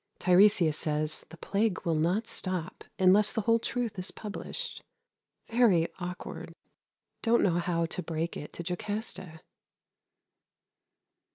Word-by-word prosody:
Tiresias 180 -3 +5
says 155 0 -2
the 170 - -12
plague 200 +3 -1
will 165 - +2
not 175 +8 +1
stop 185 -5 -3
unless 190 +3 +5
the 225 - -1
whole 230 +2 +3
truth 230 -3 -3
is 185 - -2
published. 350 - -6 0.7
Very 220 -9 +3
awkward. 180 0 -6 0.7
Don't 235 0 +3
know 175 -2 +2
how 170 -1 0
to 165 - -4
break 165 0 -3
it 150 - -7
to 170 - -6
Jocasta. 185 -3 -4
185 Hz, 120 wpm, -29 LUFS, 170-210 Hz, 0.7 s, Tiresias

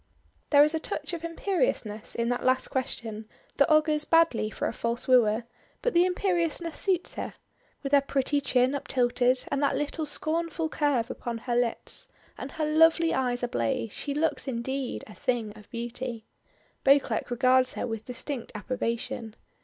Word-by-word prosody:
There 290 -1 +7
is 300 +2 +3
a 320 - 0
touch 310 +1 -4
of 335 -1 -4
imperiousness 335 - -1
in 235 0 0
that 245 - -1
last 255 0 +2
question 225 -4 -4 0.3
that 280 - +4
augurs 305 -1 +4
badly 330 -10 +3
for - - -3
a - - -3
false 235 +1 -3
wooer; 235 -3 +4 0.4
but - - +1
the 345 +1 +5
imperiousness 345 -3 0
suits 370 -3 0
her. - - -5 0.5
With 275 - -3
her 285 -1 +6
pretty 280 +1 0
chin 255 -1 +2
uptilted, 250 -2 +1
and 280 - -1
that 280 -1 +2
little 295 +2 -2
scornful 325 +2 -2
curve 280 -7 +1
upon 235 -1 -4
her 240 +1 -3
lips, 240 -1 -1 0.3
and - - -7
her 315 - -1
lovely 325 +2 +4
eyes 250 -2 0
ablaze, 200 - -1
she 285 +5 -4
looks 315 -1 0
indeed 265 +1 -3
"a 215 - -12
thing 225 -3 -2
of 210 -1 -15
beauty." 235 -1 -5 0.6
Beauclerk 270 -5 +3
regards 255 +1 +3
her - - -2
with 225 -2 -5
distinct 250 0 -5
approbation. 230 0 -3
260 Hz, 160 wpm, -28 LUFS, 235-310 Hz, 0.6 s, There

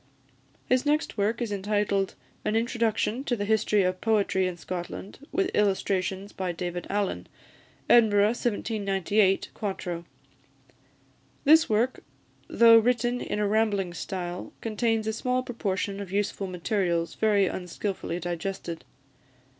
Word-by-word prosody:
His 255 0 +3
next 300 +1 0
work 220 +3 0
is 225 - -4
entitled, 200 -1 0 0.3
"An 215 - 0
Introduction 230 +1 0
to 245 - +1
the 205 -3 -3
History 210 -1 +2
of 185 0 -1
Poetry 200 -4 +2
in 180 -1 -4
Scotland, 180 +3 -6
with 380 0 0
Illustrations 195 -1 0
by 185 -2 -2
David 175 0 -4
Allan," 205 -1 -1 0.6
Edinburgh, 215 -4 +6
1798, 205 -4 0
4to. 180 -5 -4 1.4
This 315 +3 +6
work, 225 +4 +1 0.5
though 230 -1 +7
written 240 +1 +1
in - - -3
a 210 -1 +1
rambling 205 -4 +1
style, 180 -1 -5
contains 225 0 0
a 220 - -1
small 250 +3 0
proportion 200 -4 -2
of 200 -3 -7
useful 200 0 -1
materials 175 -2 -1
very 210 -3 +3
unskilfully 180 -1 -4
digested. 175 -1 -4
205 Hz, 120 wpm, -27 LUFS, 185-225 Hz, 1.4 s, though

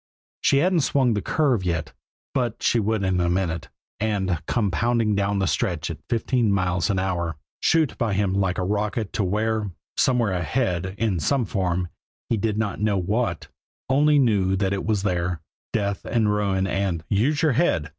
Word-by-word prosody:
She 140 - +3
hadn't 175 +4 +3
swung 130 -4 +2
the 105 - -1
curve 130 -4 +1
yet, 85 -3 -2 0.4
but 120 -3 -1
she 120 - +3
would 110 -1 0
in 95 -1 +1
a 85 - +1
minute 85 -3 -1 0.3
and 95 -6 0
come 105 -5 +1
pounding 115 +1 +1
down 100 0 0
the 95 - +1
stretch 85 -2 -1
at 80 - -7
fifty 120 +2 0
miles 90 -5 +1
an 100 - +1
hour, 85 -4 -1 0.2
shoot 160 -4 +2
by 115 -4 +1
him 100 -1 +1
like 95 -1 0
a 90 - 0
rocket 105 +2 -1
to 105 - 0
where, 105 +2 0 0.3
somewhere 120 -5 +2
ahead, 90 - -1
in 105 -6 0
some 130 - +1
form, 90 -3 -1 0.4
he - - +2
did 110 0 -1
not 105 -2 -2
know 105 -2 +2
what, 95 0 -1 0.4
only 145 +3 +4
knew 100 -8 +3
that 95 0 0
it 100 - -3
was 105 -3 +1
there, 90 -3 -1 0.3
death 100 -2 -1
and 110 -3 +1
ruin 100 -2 +1
and 95 -5 -2
"_Use 135 +10 +2
your 155 - +4
head! 115 - +1
100 Hz, 180 wpm, -24 LUFS, 95-115 Hz, 0.4 s, only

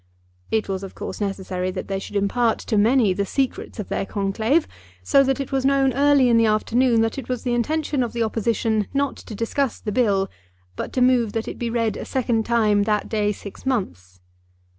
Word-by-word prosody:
It 220 -1 0
was 190 -1 -3
of 195 - -9
course - - -6
necessary 190 -2 -2
that 185 0 -5
they 195 -1 -2
should 200 - -9
impart 220 +4 +1
to 225 - -2
many 220 -1 +4
the 200 - -1
secrets 265 +6 -2
of 210 - -5
their - - -1
conclave, 220 +10 0 0.4
so 275 -1 +5
that 270 0 0
it 275 - -4
was 270 -1 0
known 270 -1 +3
early 280 0 +4
in 235 -1 +4
the 230 -1 +4
afternoon 230 +2 +2
that 225 +4 -1
it 255 - -9
was 250 -2 -2
the 245 - 0
intention 290 +3 0
of 240 - -1
the 235 -1 -1
Opposition 220 -1 0
not 280 0 0
to 220 - -9
discuss 240 +4 -1
the 210 - -4
Bill, 200 -4 +2 0.5
but - - -5
to 255 - 0
move 245 -4 +3
that 225 0 -2
it - - -6
be 235 - -2
read 230 -2 0
a - - -6
second 235 -4 0
time 215 -3 +3
that 210 -1 0
day 210 -2 +1
six 200 -1 -9
months. 95 - -3
225 Hz, 210 wpm, -22 LUFS, 205-255 Hz, 0.5 s, so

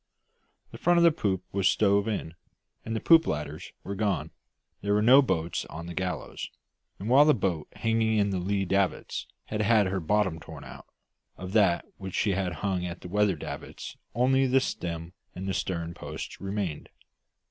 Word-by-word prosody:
The - - -10
front 175 0 +3
of 170 - +5
the 170 - +7
poop 95 - -1
was 100 -1 +2
stove 100 0 +3
in, 100 -7 -3 0.5
and 115 - -3
the - - 0
poop 165 +4 +6
ladders 75 +3 -4
were 100 - -4
gone; 100 0 -1 0.5
there 100 +1 +1
were 105 - +3
no 130 +5 +8
boats 85 - -1
on 80 +2 -8
the 85 - -6
gallows; 90 0 -4 0.5
and 100 - -6
while 135 +5 +7
the 150 -1 +5
boat 90 -8 -1
hanging 115 -1 +1
in 100 -1 +2
the 95 - -1
lee 95 +2 0
davits 95 0 -1 0.2
had 105 -1 -2
had 105 -1 +4
her 95 +1 -1
bottom 95 0 +1
torn - - -10
out, - - -11 0.5
of 95 +1 -7
that 100 -6 +3
which 95 -2 -2
had 95 -3 0
hung 95 -3 0
at 90 0 -5
the 90 - -8
weather 105 0 +2
davits 75 - -7 0.2
only 130 +2 +3
the 130 +1 +4
stem 85 -8 -4 0.2
and 95 +1 -3
stern 85 -2 -2
posts - - -7
remained. 95 -6 -3
100 Hz, 180 wpm, -28 LUFS, 90-110 Hz, 0.5 s, no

